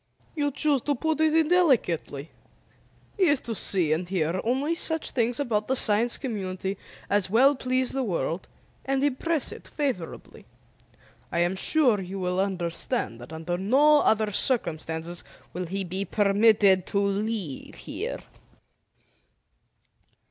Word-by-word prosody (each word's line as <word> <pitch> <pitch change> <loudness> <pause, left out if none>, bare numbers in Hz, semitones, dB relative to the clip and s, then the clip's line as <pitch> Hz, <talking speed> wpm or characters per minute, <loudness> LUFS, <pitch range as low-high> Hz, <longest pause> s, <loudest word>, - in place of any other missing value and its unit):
"You 290 -2 0
choose 285 -1 +1
to 290 +3 0
put 315 +4 -1
it 315 0 +3
indelicately. 270 - +1 0.9
He 385 - +4
is 290 -5 +3
to 230 - -4
see 180 -7 +2
and 175 +3 -3
hear 180 -1 -1
only 265 +7 0
such 320 -1 -1
things 240 +1 0
about 220 -7 -1
the 265 - +1
Science 230 0 +4
Community 190 -6 -4 0.3
as 200 -2 +1
will 260 +7 +5
please 255 -1 -1
the 270 - -1
world 180 -5 -2 0.4
and 270 0 0
impress 290 +2 0
it - - -10
favorably. 260 - -5 0.8
I - - -2
am 175 +2 +1
sure 245 0 +2
you 190 +1 -6
will 180 0 -1
understand 180 - -2
that 120 - -11
under 165 +2 -4
no 285 +9 +5
other 215 -1 +2
circumstances 170 -7 -1 0.3
will 180 0 -4
he 195 +3 -3
be 190 +2 -3
permitted 200 -2 +3
to 200 - 0
leave 200 - -2
here." - - -5
210 Hz, 135 wpm, -26 LUFS, 180-270 Hz, 0.9 s, will